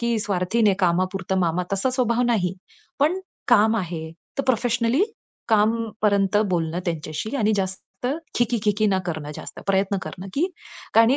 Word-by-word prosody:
की 235 Hz, -1 st, +1 dB
स्वार्थीने 200 Hz, +1 st, +2 dB
'कामापुरतं 185 Hz, +2 st, +1 dB
मामा' 175 Hz, +1 st, +1 dB
तसा 195 Hz, +7 st, +1 dB
स्वभाव 245 Hz, -2 st, +1 dB
नाही. 190 Hz, -7 st, +1 dB, 0.5 s
पण 335 Hz, +7 st, +3 dB, 0.3 s
काम 220 Hz, -1 st, +5 dB
आहे, 165 Hz, -4 st, -3 dB, 0.3 s
तर -, -, +2 dB
प्रोफेशनली 240 Hz, -, +2 dB, 0.4 s
कामपर्यंत 210 Hz, -2 st, +2 dB
बोलणं 170 Hz, 0 st, 0 dB
त्यांच्याशी 165 Hz, -, -3 dB
आणि 215 Hz, -3 st, +2 dB
जास्त 190 Hz, -1 st, -2 dB, 0.5 s
खी-खी 240 Hz, 0 st, +2 dB
खी-खी 210 Hz, +1 st, +2 dB
न 190 Hz, -2 st, +2 dB
करणं 155 Hz, -3 st, -4 dB
जास्त. -, -, -8 dB
प्रयत्न 195 Hz, 0 st, +2 dB
करणं, 185 Hz, +1 st, -7 dB, 0.7 s
कारण 225 Hz, 0 st, +7 dB
की -, -, +3 dB
205 Hz, 140 wpm, -24 LUFS, 180-230 Hz, 0.7 s, कारण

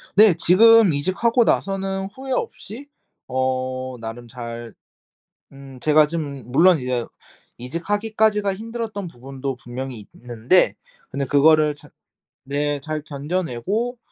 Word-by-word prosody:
네. 210 Hz, -4 st, +7 dB
지금 220 Hz, +3 st, +6 dB
이직하고 195 Hz, -, +1 dB
나서는 195 Hz, -1 st, -1 dB
후회 265 Hz, 0 st, -6 dB
없이 240 Hz, +2 st, -5 dB, 0.4 s
어 130 Hz, 0 st, -2 dB
나름 115 Hz, +1 st, -8 dB
잘 115 Hz, -1 st, -8 dB, 0.8 s
음 135 Hz, -2 st, -13 dB
제가 150 Hz, +3 st, +4 dB
지금 145 Hz, -5 st, -5 dB
물론 165 Hz, +7 st, +4 dB
이제 125 Hz, -2 st, -2 dB, 0.5 s
이직하기까지가 205 Hz, -, 0 dB
힘들었던 220 Hz, -2 st, -5 dB
부분도 135 Hz, 0 st, -6 dB
분명히 120 Hz, -3 st, -7 dB, 0.2 s
있는데 120 Hz, +9 st, +2 dB, 0.3 s
근데 140 Hz, +1 st, -2 dB
그거를 150 Hz, +2 st, +4 dB
잘 -, -, -17 dB, 0.6 s
네 145 Hz, +1 st, -1 dB
잘 155 Hz, +2 st, -4 dB
견뎌내고 175 Hz, -, -3 dB
150 Hz, 250 characters per minute, -22 LUFS, 130-195 Hz, 0.8 s, 네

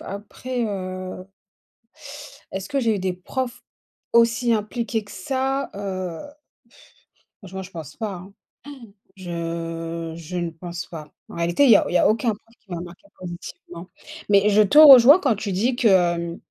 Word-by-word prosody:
après, 235 Hz, +5 st, -6 dB
heu 185 Hz, -2 st, -6 dB, 1.3 s
est-ce 195 Hz, 0 st, -5 dB
que 280 Hz, -, -1 dB
j'ai 225 Hz, -3 st, +1 dB
eu 200 Hz, -, -2 dB
des 185 Hz, -1 st, -2 dB
profs, 245 Hz, +7 st, -5 dB, 0.5 s
aussi 235 Hz, +1 st, +3 dB
impliqués 225 Hz, +1 st, -2 dB
que 205 Hz, -, -16 dB
ça? 270 Hz, -1 st, -2 dB
Heu 185 Hz, -4 st, -5 dB, 1.2 s
franchement, 190 Hz, 0 st, -7 dB
je 185 Hz, -, -11 dB
pense 160 Hz, -5 st, -9 dB
pas, 220 Hz, -3 st, -4 dB
hein. 185 Hz, +2 st, -11 dB, 0.8 s
Je 165 Hz, -2 st, -5 dB
je 170 Hz, +2 st, -7 dB
ne 170 Hz, -1 st, -2 dB
pense 170 Hz, +1 st, -7 dB
pas, 155 Hz, -3 st, -10 dB, 0.2 s
en -, -, -10 dB
réalité 170 Hz, +10 st, +2 dB
il 270 Hz, -, +5 dB
y 215 Hz, -, +9 dB
a -, -, +1 dB
il -, -, -5 dB
y -, -, +5 dB
a -, -, +4 dB
aucun 225 Hz, +2 st, +1 dB
prof 225 Hz, +3 st, -23 dB
qui -, -, -39 dB
va 175 Hz, -2 st, -5 dB
marquer 180 Hz, +10 st, -13 dB
positivement, 175 Hz, 0 st, -10 dB, 0.4 s
mais 205 Hz, 0 st, +4 dB
je 210 Hz, +1 st, +4 dB
te 210 Hz, +7 st, +2 dB
rejoins 285 Hz, 0 st, +10 dB
quand 265 Hz, -8 st, +2 dB
tu 205 Hz, -1 st, -4 dB
dis 230 Hz, +7 st, 0 dB
que: 175 Hz, -7 st, +2 dB
195 Hz, 165 wpm, -22 LUFS, 175-230 Hz, 1.3 s, rejoins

